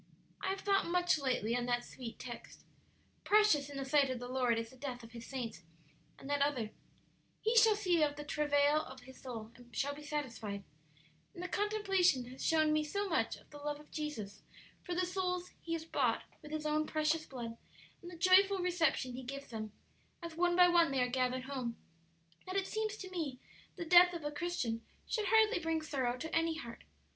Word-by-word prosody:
"I - - -2
have 390 0 -1
thought 395 -2 +2
much 355 -2 +2
lately 250 -4 0
on 245 0 -1
that 245 0 +1
sweet 240 -3 -8
text, 240 -1 -9 0.6
'Precious 410 -10 +4
in 285 - -7
the 270 - -3
sight 275 0 +4
of 255 - -2
the 245 +1 -6
Lord 250 -2 +1
is 230 0 -4
the - - -15
death 255 -2 -6
of 230 - -12
His 235 -1 -9
saints;' 245 -9 -5 0.6
and - - -11
that 285 0 0
other, 255 -7 +1 0.7
'He 450 +2 +1
shall 450 -2 +7
see 365 -5 +2
of 290 -1 +2
the 295 - -6
travail 295 0 +2
of 260 0 -10
his 260 +1 -14
soul, 225 -4 -7
and 240 0 -16
shall 285 +1 0
be 295 - -10
satisfied,' 230 -9 -4 0.7
and 350 - -6
the - - -2
contemplation 390 - +2
has 260 - -8
shown 310 -1 +3
me 305 0 +2
so 400 +7 -2
much 325 - +1
of - - -21
the 295 - -10
love 295 0 -3
of 300 - -17
Jesus 220 -10 -5 0.4
for 355 - -4
the 365 +1 +2
souls 360 -1 -2
He 335 - -4
has 325 -1 -3
bought - - +1 0.2
with 300 - -10
His 305 0 -4
own 305 0 +1
precious 310 +1 0
blood 235 -3 -6 0.5
and 350 - -9
the 350 - -10
joyful 380 +3 +6
reception 345 -8 +1
He 255 - -5
gives 275 +2 -7
them, 215 -2 -5 0.5
as 335 -1 -5
one 350 +1 +2
by 360 0 +8
one 345 -2 +5
they 265 -2 +2
are 250 - 0
gathered 255 0 0
home, 255 -4 -4 0.7
that 370 - -4
it 390 -1 +1
seems 435 0 -2
to 375 -2 -8
me 300 -8 -3 0.4
the 340 - -5
death 355 +1 +8
of 335 - -5
a 295 - -2
Christian 295 -8 -2 0.2
should 430 -3 -1
hardly 440 0 +5
bring 325 -1 -1
sorrow 260 -5 -1
to 320 +5 -4
any 325 0 +1
heart. 235 -5 -9
300 Hz, 210 wpm, -34 LUFS, 255-355 Hz, 0.7 s, by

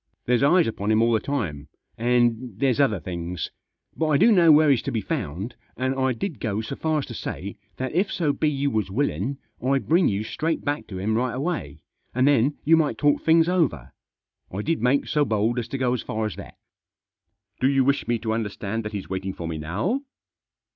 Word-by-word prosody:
There's 125 0 +2
eyes 165 +5 +5
upon 105 -2 -3
him 110 0 +4
all 115 - +3
the 110 - +3
time, 85 - -3 0.3
and 120 -1 +1
there's 130 0 +1
other 110 -9 +3
things. 85 +1 -5 0.4
But 160 - 0
I 150 -2 +3
do 235 - +5
know 175 -6 +6
where 150 0 +6
he's 130 - +3
to - - -4
be 115 - 0
found, 105 - -4 0.2
and 130 +1 0
I 130 -1 +1
did 130 - -4
go 105 -3 -2
so 125 +5 -5
far 155 +1 0
as 145 - -1
to 120 - -8
say 100 -2 -5 0.2
that 130 +1 -3
if 190 +4 +1
so 150 -5 0
be 155 - +1
you 140 -1 -1
was 110 -3 -1
willin' 125 - -1 0.3
I'd 135 +1 +1
bring 170 +3 +4
you 100 +1 0
straight 160 +8 -2
back 145 +1 -2
to 95 - -7
him 100 +4 -1
right 120 +2 0
away, 125 - -3 0.3
and 130 +2 +3
then 140 0 +3
you 165 +3 +6
might 160 -2 +1
talk 145 -1 +2
things 165 0 +4
over; 160 - 0 0.6
I 100 +3 -4
did 165 0 -1
make 125 +4 +2
so 150 -1 +2
bold 115 0 +1
as 120 - -4
to 135 - -4
go 125 -2 +1
as 125 - -1
far 110 0 -3
as 105 - -4
that." - - -11 0.5
" 100 0 -51
Do 130 - +4
you 135 -1 +3
wish 140 +2 +1
me 120 - +1
to 110 -1 0
understand 110 0 -3
that 105 0 -6
he's 100 -2 -5
waiting 95 0 -3
for 85 - -6
me 80 -1 -4
now 105 - -1
125 Hz, 225 wpm, -24 LUFS, 105-145 Hz, 0.6 s, know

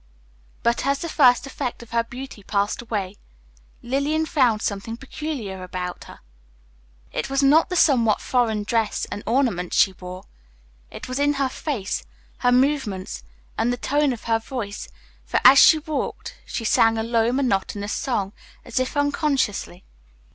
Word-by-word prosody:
But 235 +1 +1
as 280 0 +2
the 335 - -5
first 255 -6 +4
effect 250 -3 -5
of 235 - -17
her 235 0 +2
beauty 245 -1 -9
passed 200 +2 -1
away, 205 -4 -4 0.7
Lillian 280 +5 0
found 245 -8 +2
something 205 +3 -3
peculiar 270 -8 -6
about 180 0 -5
her. - - -13 0.9
It - - -3
was 275 +1 +1
not 300 +6 +5
the 365 - -2
somewhat 240 -10 +4
foreign 225 -4 0
dress 220 -1 0
and 205 - -4
ornaments 225 -8 0
she 190 - +5
wore; 185 0 -9 0.7
it - - -9
was 255 +2 -3
in 290 0 +3
her 275 -2 0
face, 255 -9 -3 0.4
her 245 - +3
movements, 250 - 0 0.4
and 240 - +2
the 245 - -2
tone 290 +3 +1
of 240 - -6
her 225 -1 +1
voice, 225 -4 -6 0.4
for - - 0
as 270 - +10
she 315 - +8
walked 305 -2 -4
she 230 - -4
sang 225 +1 +4
a 220 - -1
low, 230 0 +1
monotonous 205 -5 -1
song, 205 -7 -2 0.3
as 245 0 -2
if 255 +3 -2
unconsciously. 280 - 0
240 Hz, 155 wpm, -23 LUFS, 205-275 Hz, 0.9 s, as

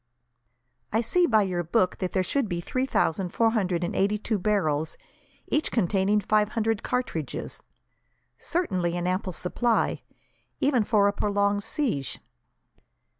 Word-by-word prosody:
"I 220 - +2
see, 345 +10 +3
by 220 -3 +4
your 180 -2 -1
book, 185 +2 +1
that 185 -2 -2
there 185 - +1
should 250 +4 -1
be 175 -2 -2
three 255 +9 -2
thousand 180 -5 0
four 225 +5 +2
hundred 185 -6 0
and 175 - -2
eighty 200 +2 +2
two 215 0 -2
barrels, 160 -7 0 0.5
each 300 - +1
containing 200 -1 +2
five 210 +1 +2
hundred 225 -1 0
cartridges. 170 - -3 0.8
Certainly 185 - -1
an 175 - -2
ample 185 +1 -1
supply, 225 +8 0 0.6
even 265 -5 +3
for 205 -1 +3
a 200 - +1
prolonged 205 0 +1
siege." 215 - -2
205 Hz, 140 wpm, -26 LUFS, 180-225 Hz, 0.8 s, by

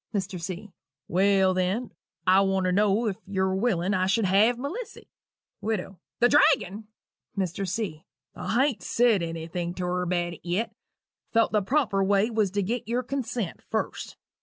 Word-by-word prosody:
MR. 190 -2 -2
C. 185 +4 -6 0.4
"Well, 190 +1 +3
then, 185 +6 -1 0.3
I 190 +1 +6
want 195 -1 +1
to 185 - +2
know 205 +4 +2
if 200 -3 -1
yu're 190 -1 0
willing 190 -3 +1
I 185 -1 +1
should 195 +3 +2
have 210 +6 +4
Melissy?" 350 - -6 0.5
WIDOW. 195 -4 -3 0.2
"The 240 - +6
dragon!" 215 -7 +3 0.5
MR. 190 +1 -2
C. 180 -6 -3 0.3
"I 250 +4 +1
hain't 250 -10 -2
said 230 -1 +3
anything 170 +1 -4
to 180 - -3
her 180 0 -1
about 175 -1 -1
it - - -12
yet 180 +7 -1 0.6
thought 230 -1 +3
the 210 - +2
proper 205 -3 +1
way 200 +3 +2
was 215 -3 +1
to 200 +1 -1
get 230 +3 -3
your 245 +2 0
consent 245 -7 -3
first. - - -3
195 Hz, 160 wpm, -26 LUFS, 185-225 Hz, 0.6 s, I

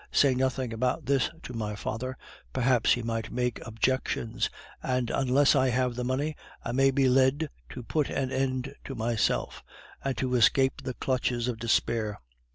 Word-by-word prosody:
Say 140 -2 +4
nothing 130 -1 -1
about 125 +6 -1
this 135 0 +2
to 125 - -7
my 105 -2 -3
father; 130 +5 -4 0.4
perhaps 125 -2 +3
he 120 - -2
might 115 -1 -3
make 125 -1 -1
objections, 115 0 0 0.3
and 125 -2 -1
unless 135 +2 +4
I 130 -1 +3
have 125 0 +1
the 125 +1 -3
money, 140 +5 -1 0.3
I 120 - -1
may 135 +2 +4
be 135 0 +3
led 135 +4 +3 0.2
to 125 - -7
put 150 +4 0
an 130 -1 -1
end 130 0 -1
to 135 - -5
myself, 115 -1 0 0.4
and 135 -1 -2
so 130 -1 -1
escape 130 +3 +4
the 130 - -4
clutches 125 -2 0
of 120 -3 -2
despair. 110 -2 0
125 Hz, 165 wpm, -28 LUFS, 120-135 Hz, 0.4 s, Say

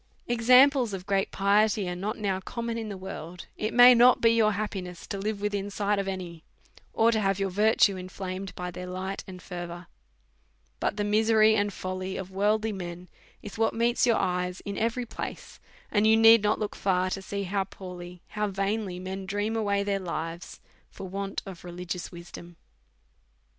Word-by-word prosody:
Examples 250 0 +5
of 185 -1 -8
great 195 -1 0
piety 205 0 +2
are 180 - -3
not 205 +5 -3
now 195 -3 -1
common 235 +4 -4
in 225 -2 -4
the 200 - -6
Avorld, 180 -2 -8
it 215 +1 -2
may 245 +1 +9
not 245 +1 +6
be 230 - +5
your 220 -2 +3
happiness 190 -4 -5
to 200 - -5
live 205 0 -3
within 205 -1 -2
sight 205 0 0
of 195 - -2
any, 175 -4 -6 0.5
or 225 +1 +3
to 220 - +1
have 195 -2 +1
your 195 -1 -1
virtue 210 0 +3
inflamed 185 +1 -6
by 180 0 -5
their 180 +1 -7
light 185 +2 -4
and 185 -1 -10
fervour; 175 -1 -7 0.9
but - - -1
the 205 - 0
misery 220 +1 +4
and 205 -1 +1
folly 185 0 -5
of 190 0 -6
worldly 210 +3 +1
men 180 -2 -7 0.3
is 210 +1 -9
what 225 0 +2
meets 235 +2 +2
your 230 - +4
eyes 180 -1 -1
in 200 -1 -5
every 230 +3 -1
place, - - -7 0.3
and 210 0 +3
you 220 0 +6
need 225 0 +8
not 210 +1 +1
look 210 - -4
far 185 -1 0
to 195 - -3
see 200 +1 -4
how 195 +1 -1
poorly, 180 -2 -10
how 210 0 -1
vainly, 195 -1 -2
men 190 +1 -6
dream 205 +3 -1
away 200 -2 +1
their 200 -1 -1
lives 170 -1 -5 0.3
for 190 - -9
want 195 +1 -4
of 190 -4 -9
religious 180 0 -6
wisdom. 175 0 -11
195 Hz, 185 wpm, -27 LUFS, 185-215 Hz, 0.9 s, may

